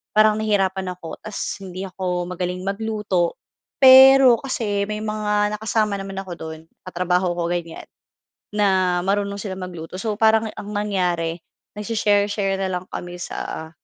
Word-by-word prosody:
parang 215 0 +5
nahirapan 195 -3 0
ako, 175 -2 -9
tapos 210 -1 -5
hindi 185 0 -6
ako 180 -1 -3
magaling 180 0 -3
magluto. 200 -4 -1 0.4
Pero 265 -2 +8
kasi, 210 -7 -1
may 210 0 -3
mga 210 -1 0
nakasama 215 -1 0
naman 195 0 -6
ako 185 - -10
do'n, 160 0 -7 0.3
katrabaho 180 0 0
ko, 170 0 -2
ganyan 170 -2 -4 0.7
na 190 -4 +2
marunong 200 0 0
silang 190 -2 -6
magluto. 175 -2 -8
So 215 -1 -3
parang, 220 0 +3
ang 205 - -8
nangyari 180 -5 -1 0.4
nagse-share-share 205 -2 +1
na 195 - -1
lang 180 - -12
kami 175 0 -6
sa, 160 -2 -6
195 Hz, 140 wpm, -22 LUFS, 180-210 Hz, 0.7 s, Pero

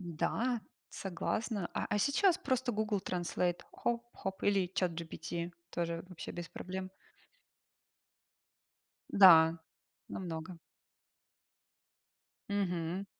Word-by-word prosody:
Да, 220 +8 -1 0.3
согласна. 195 +2 -2
А - - -1
а, 205 - +2
сейчас 345 - +4
просто 260 -7 0
Google 210 -1 0
Translate. 175 -1 -1
Хоп-хоп. 235 -5 -3
Или 195 -3 +2
ChatGPT. 170 0 -2 0.2
Тоже 170 0 -2
вообще 180 - -7
без 175 -1 -6
проблем. 185 0 -5 2.2
Да, 165 -4 +8 0.5
намного. 170 -1 -5 1.9
Мгм. 185 -2 -1
185 Hz, 80 wpm, -34 LUFS, 170-205 Hz, 2.2 s, Да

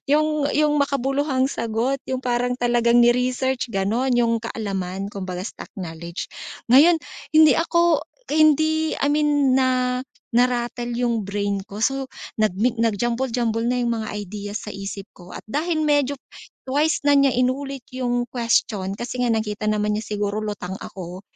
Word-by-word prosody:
'Yung, 305 0 +2
'yung 300 -1 +3
makabuluhang 275 0 +1
sagot, 230 +4 -1
'yung 260 0 -3
parang 245 0 0
talagang 240 -1 +2
ni-research 250 +1 +1
gano'n, 220 +5 0
'yung 230 -1 +2
kaalaman, 195 -3 -4
kumbaga 185 -2 -5
stock - - -8
knowledge, 170 -1 -6 0.5
ngayon, 320 +7 +7 0.4
hindi 315 -1 +8
ako 340 -1 +3 0.3
hindi 315 +1 +3
I 285 - 0
mean 290 -3 +3
na 255 -1 +1 0.4
narattle 240 -1 +1
'yung 235 -3 0
brain 200 -1 -1
ko, 205 +2 -7
so, 270 0 -1 0.3
nag 215 -3 +3
mi 235 +5 +2
nag 225 -2 +1
jumble-jumble 235 -1 -1
na 250 0 +1
'yung 235 -1 0
mga 220 -1 -3
ideas 205 +1 -6
sa - - -5
isip 195 0 -6
ko 180 0 -13
at - - -9
dahil 310 +4 0
medyo 290 -2 +2 0.5
twice 295 +4 +1
na 290 - +5
niya 275 -2 +4
inulit 260 +1 -1
'yung 245 -1 -1
question, 225 -5 0
kasi 245 +2 -5
nga 235 - +2
nakita 215 -1 -1
naman 210 0 +1
niya 215 - -4
siguro 205 +1 -1
lutang 205 -3 -5
ako 185 0 -8
240 Hz, 150 wpm, -22 LUFS, 210-270 Hz, 0.5 s, hindi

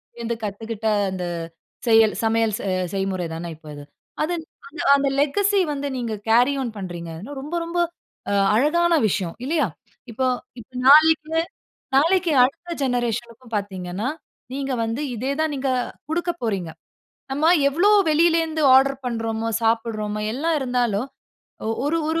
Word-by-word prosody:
டேயிருந்து 235 0 -3
கத்துக்கிட்ட 220 +1 -4 0.2
அந்த 185 -1 -4 0.6
செயல் 225 -2 +5
சமையல் 225 -1 +2
செ 200 - -4 0.3
செய்முறை 190 -2 -1
தான 170 +1 -5
இப்ப 155 0 -23
இது. 145 - -9 0.4
அது 310 +3 0 0.3
அந்த 315 +5 -12 0.2
அந்த 280 0 +1
லெகசி 400 +8 +2
வந்து 285 0 -3
நீங்க 235 -3 -3 0.2
கேரி 245 +5 +5
ஆன் 235 -4 -4
பண்றீங்க, 175 -3 -6
அதுலா 230 - -8
ரொம்ப 300 +5 -5
ரொம்ப 345 +1 -2 0.5
அ - - +1 0.2
அழகான 340 +8 +3
விஷயம், 180 -4 -2
இல்லையா? 300 -5 +1 0.4
இப்ப 230 - -7 0.4
இப்ப 220 - -20 0.2
நாளைக்கே 315 +2 +6 0.5
நாளைக்கே 335 +3 +3
அடுத்த 330 +7 -2
ஜெனரேஷனுக்கும் 240 -1 -2
பார்த்தீங்கன்னா, 195 +1 -3 0.5
நீங்க 275 0 -3
வந்து 230 +6 -3
இதே 260 +5 -2
தான் 315 -1 0
நீங்க 270 0 -1 0.4
குடுக்க 345 +2 0
போறீங்க. 195 -7 -1 0.6
நம்ம 290 +3 -1 0.2
எவ்ளோ 345 +9 +3 0.2
வெளில 330 +2 +4
இருந்து 315 -1 -3
ஆர்டர் 270 +1 +5
பண்றோமோ, 225 -2 -2 0.2
சாப்பிடுறோமா 225 -2 0
எல்லாம் 315 +6 0
இருந்தாலும் 245 -3 0 0.6
ஒ 220 - 0
ஒரு 305 +3 +1
ஒரு 325 +1 0
245 Hz, 140 wpm, -23 LUFS, 215-305 Hz, 0.6 s, நாளைக்கே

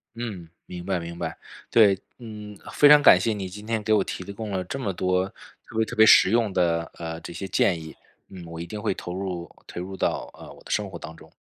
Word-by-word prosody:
嗯， 105 -8 -6 0.2
明 90 -1 -8
白 95 -2 0
明 85 0 -7
白。 85 -2 -4 0.3
对， 100 -4 +5 0.2
嗯， 105 -3 -9 0.2
非 145 - +6
常 150 0 +9
感 90 - +8
谢 110 +4 0
你 100 -2 -4
今 105 +3 -10
天 110 -2 -1
给 110 +1 +2
我 105 - +4
提 90 - -5
供 110 +1 -6
了 95 -1 -1
这 130 +9 -5
么 105 -7 -1
多 90 +1 +1 0.4
特 - - -14
别 110 - +3
特 120 - -7
别 110 0 +7
实 100 - +7
用 115 -2 +2
的， 85 -2 +1
呃， 80 -1 -5
这 - - -8
些 95 - -5
建 90 -1 +2
议， 80 0 -10 0.3
嗯， 95 -2 -10
我 85 0 -8
一 85 - -4
定 105 +4 -7
会 105 -2 0
投 90 - -7
入 90 -2 -4 0.2
投 - - -7
入 95 +2 -6
到， - - -1
呃， - - -12
我 - - -16
的 - - -9
生 - - 0
活 - - -8
当 80 - -9
中。 - - -17
95 Hz, 265 characters per minute, -25 LUFS, 85-110 Hz, 0.4 s, 常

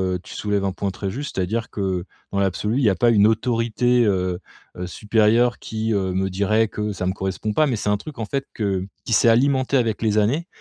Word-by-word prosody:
heu, 90 - -3
tu - - -11
soulèves 105 -1 -1
un 95 - 0
point 100 -1 -2
très 95 +1 -4
juste. 140 +8 -5
C'est-à-dire 110 +6 -1
que, 95 -3 -2 0.3
dans 100 - -1
l'absolu, 100 +4 0
il 140 - +1
y 110 - +5
a 95 - +1
pas 120 +6 +3
une 105 -2 +5
autorité, 120 +2 +1
heu, 90 -3 0 0.5
supérieure 110 +5 +2
qui, 110 0 -2
heu, 95 -2 0
me 95 +1 0
dirait 105 +4 +1
que 105 0 -3
ça 90 -1 -4
me 95 - +1
correspond 95 +2 -3
pas 150 +8 +3
mais 125 - 0
c'est 105 - -2
un 105 - +2
truc 140 +5 -10
en 115 - -3
fait 135 +6 -3
que 95 -3 -1 0.2
qui - - -6
s'est 115 - +4
alimenté 130 +3 +2
avec 115 -5 +1
les 110 -2 +1
années 140 - +1
105 Hz, 230 wpm, -22 LUFS, 95-120 Hz, 0.5 s, y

